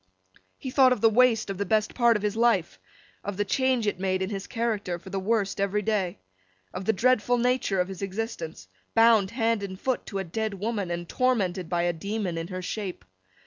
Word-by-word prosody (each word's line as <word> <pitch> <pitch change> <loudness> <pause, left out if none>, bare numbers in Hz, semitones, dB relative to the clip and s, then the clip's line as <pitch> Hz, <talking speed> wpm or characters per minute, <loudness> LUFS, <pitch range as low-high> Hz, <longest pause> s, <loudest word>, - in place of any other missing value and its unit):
He 260 - -6
thought 260 -1 +5
of 245 - -5
the 225 - +5
waste 230 -3 +3
of 195 - -6
the - - +1
best 215 +1 +1
part 235 -2 +4
of 210 - -8
his 210 0 0
life, 225 -7 +2 0.4
of 205 -2 -4
the 205 - 0
change 260 0 +1
it 205 -3 -1
made 185 0 0
in 190 - -3
his 195 -1 -5
character 220 -6 -2
for 185 +2 -12
the 195 - -1
worse 200 0 0
every 200 +1 0
day, 200 -5 0 0.6
of 185 - -5
the 220 - +4
dreadful 245 +2 +2
nature 245 -5 +1
of 180 - +1
his 190 -1 -8
existence, 190 - -5 0.3
bound 225 -4 +5
hand 230 -1 0
and 190 -2 -6
foot, 260 +2 -2
to 200 - -4
a 195 - -1
dead 215 +4 -3
woman, 205 -1 -2
and 175 0 -4
tormented 195 -9 0
by 175 -1 +1
a 175 0 +1
demon 200 +1 -3
in 165 0 -4
her 185 0 -5
shape. 190 0 -5
205 Hz, 215 wpm, -27 LUFS, 185-230 Hz, 0.6 s, thought